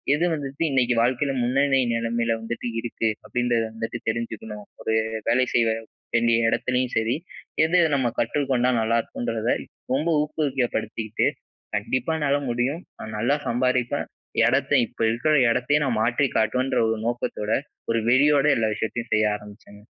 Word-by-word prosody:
"எது 165 +4 +1
வந்துட்டு 140 +1 -4
இன்னைக்கு 125 -2 +2
வாழ்க்கையில 130 +4 +1
முன்னனி 135 +2 +2
நிலமையில 115 0 0
வந்துட்டு 120 +1 -4
இருக்கு?" 115 -1 -1 0.2
அப்படின்றத 120 -2 0
வந்துட்டு 115 +1 -4
தெரிஞ்சுக்கணும். 110 -2 -5 0.4
ஒரு 110 - -5 0.2
வேலை 130 +2 +3
செய்ய 115 -2 +3 0.4
வேண்டிய 115 0 +3
இடத்திலயும் 125 +1 0
சரி, 110 +2 +1 0.5
எது 175 +3 +3 0.2
நம்ம 125 -4 +1
கற்றுக்கொண்டா 130 0 +1
நல்லா 115 +1 +2
இருக்குன்றத, 115 -1 -3 0.4
ரொம்ப 150 +5 +1
ஊக்கப்படுத்திக்கிட்டு, 125 -8 -1 0.5
கண்டிப்பா 125 +7 -1
என்னால 145 -1 +2
முடியும்! 125 +8 -1 0.2
நான் 110 - -7
நல்லா 120 +7 +2
சம்பாரிப்பேன்! 125 0 0 0.4
இடத்த - - +1 0.2
இப்ப - - -28
இருக்கிற 120 +7 +1 0.2
இடத்தையே 125 +5 +2
நா 135 - 0
மாற்றி 120 +5 +2
காட்டுவேன்ற 125 +5 +1
ஒரு 110 - 0
நோக்கத்தோட, 120 -3 -2 0.4
ஒரு 115 - +2
வெறியோட 140 +3 +4
எல்லா 110 -1 +1
விஷயத்தையும் 115 +2 -4
செய்ய 110 -1 +3
ஆரம்பிச்சேங்க. 105 0 -13
120 Hz, 135 wpm, -24 LUFS, 115-135 Hz, 0.5 s, வெறியோட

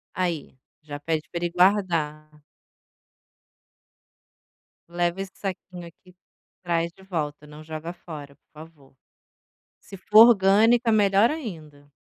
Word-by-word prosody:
Aí, 170 -7 -3 0.3
já 145 -1 -8
pede 155 +1 -2
para 170 0 -4
ele 170 - -3
guardar. 165 -6 0 2.5
"Leva 175 +2 -1
esse 195 - -7
saquinho 180 -2 -7
aqui, 180 +2 -19 0.5
traz 170 -1 -1
de 190 - -20
volta, 150 -5 -5
não 150 +1 -12
joga 160 +2 -7
fora, 145 -5 -11
por - - -49
favor". 155 -3 -15 0.9
Se 195 - -12
for 215 +5 +7
orgânica, 225 +3 +4
melhor 205 +1 +4
ainda. 155 - -8
170 Hz, 115 wpm, -24 LUFS, 155-195 Hz, 2.5 s, for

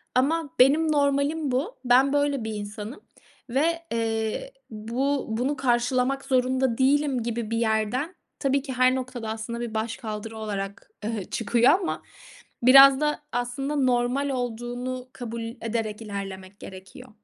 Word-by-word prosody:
ama 295 +4 +2
benim 300 +5 +5
normalim 285 +1 +1
bu. 285 - -2
Ben 260 +3 +5
böyle 285 -3 +1
bir 220 0 -4
insanım 210 - -7 0.5
ve, 330 +6 +1
eee, 225 - -2 0.2
bu 245 +6 -2
bunu 245 +6 -1
karşılamak 255 +2 +1
zorunda 260 -2 +1
değilim 270 -1 +2
gibi 230 -1 -3
bir 230 - 0
yerden 230 - 0 0.2
tabii 275 -1 +1
ki 270 -2 -6
her 255 +1 +4
noktada 250 -3 -5
aslında 225 +2 -4
bir 235 -2 -4
başkaldırı 220 0 -4
olarak, 200 -1 -5
eee, 215 -2 -2
çıkıyor 235 +2 +3
ama 355 - -3 0.6
biraz 270 +2 +9
da, 300 0 0
aslında, 245 +4 -2
normal 255 +1 +1
olduğunu 245 0 -4
kabul 235 -2 -6 0.2
ederek 225 -1 -3
ilerlemek 195 -2 -7
gerekiyor. 195 +8 -11
250 Hz, 130 wpm, -25 LUFS, 225-275 Hz, 0.6 s, biraz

